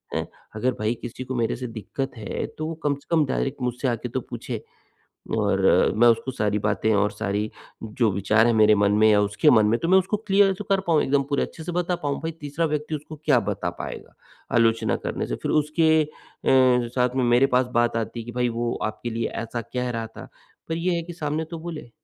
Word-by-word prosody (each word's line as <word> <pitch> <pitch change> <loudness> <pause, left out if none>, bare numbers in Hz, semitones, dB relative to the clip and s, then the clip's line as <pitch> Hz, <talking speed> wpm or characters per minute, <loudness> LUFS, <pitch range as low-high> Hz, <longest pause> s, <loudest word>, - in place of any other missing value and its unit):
हैं? - - -2 0.3
अगर 125 +4 0
भई, 110 +2 +1
किसी 125 +2 -6
को 130 0 -5
मेरे 115 -2 0
से 125 0 -5
दिक्कत 120 +4 -5
है, 105 - -4
तो 155 - -6
वो 165 - -4
कम 145 -1 +1
से 140 - -18
कम 160 -3 +4
डायरेक्ट 135 0 -2
मुझसे 125 +2 -1
आके 120 0 -2
तो 130 +2 -2
पूछे 120 -1 -5 0.7
और - - +1 0.4
मैं 120 +2 +6
उसको 115 +3 +2
सारी 105 -3 0
बातें 110 +1 +1
और 105 +1 +2
सारी 105 0 -2 0.3
जो 110 +1 +1
विचार 110 +4 +3
हैं 120 - +3
मेरे 110 -1 +6
मन 100 0 +3
में 110 - +7
या 105 -1 +5
उसके 105 0 +3
मन 110 -1 +5
में, 115 +3 +2
तो 165 - -1
मैं 190 +1 +6
उसको 190 +3 0
क्लियर 195 0 +5
तो 210 - -5
कर 195 -1 +3
पाऊँ, 160 -3 +3
एकदम 140 +1 +2
पूरे 140 - +1
अच्छे 160 - -6
से 175 - -4
बता 175 0 0
पाऊँ। 140 -1 -1
भई, 165 - -2
तीसरा 155 +1 -3
व्यक्ति 150 0 -2
उसको 150 +1 -7
क्या - - +4
बता - - -2
पाएगा - - -7 0.4
आलोचना 115 -1 +3
करने - - -2
से? - - -3
फिर - - -1
उसके 160 +1 +3
अ, 150 - -12 0.4
साथ 125 -1 +3
में 130 - +2
मेरे 120 +3 +4
पास 130 - +3
बात 120 -1 +2
आती 115 +1 -3
है - - -7
कि, 120 - -6
"भई, 125 0 0
वो 120 0 -2
आपके 110 +3 -4
लिए 115 +1 -2 0.2
ऐसा 115 +1 -4
कह 125 0 -1
रहा 115 -1 -3
था।" 110 - -11 0.4
पर 160 - -1
ये 175 +2 0
है 170 - -2
कि 175 +1 -8
सामने 155 -1 -2
तो 165 - -5
बोले। 160 -7 -7
125 Hz, 230 wpm, -24 LUFS, 115-155 Hz, 0.7 s, में